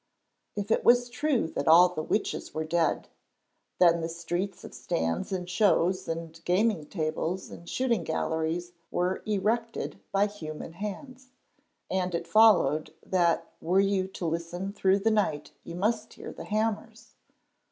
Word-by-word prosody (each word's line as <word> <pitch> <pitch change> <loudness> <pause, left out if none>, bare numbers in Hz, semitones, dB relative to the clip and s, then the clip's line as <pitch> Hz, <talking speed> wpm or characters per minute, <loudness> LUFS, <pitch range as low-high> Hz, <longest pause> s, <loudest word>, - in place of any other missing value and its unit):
If 205 +1 -3
it - - +2
was 245 0 +4
true 280 - 0
that 140 - -4
all 175 +3 +8
the 175 -3 -4
witches 205 +6 -2
were 155 - -1
dead, 160 0 0 0.7
then 170 -2 +5
the 165 - -2
streets 175 +3 -4
of - - -10
stands 80 - -2
and 180 -2 -3
shows 185 -1 +2
and 165 0 -5
gaming 185 -3 +1
tables 160 +2 -3
and 170 - -10
shooting 235 -8 0
galleries 160 +2 -2 0.2
were 180 +1 -1
erected 220 +3 -1
by 200 +1 +3
human 165 -6 -7
hands, 255 - -7 0.6
and 185 -2 -1
it 170 - -3
followed 170 -7 +4
that 170 -2 +1
were 180 +4 +2
you 195 -1 +2
to 190 -2 -6
listen 170 +4 -3
through 195 -1 +3
the 220 +3 +1
night 175 -9 0
you 170 - -8
must 215 +4 -1
hear - - -9
the - - -9
hammers. 220 +1 -3
185 Hz, 150 wpm, -28 LUFS, 165-210 Hz, 0.7 s, all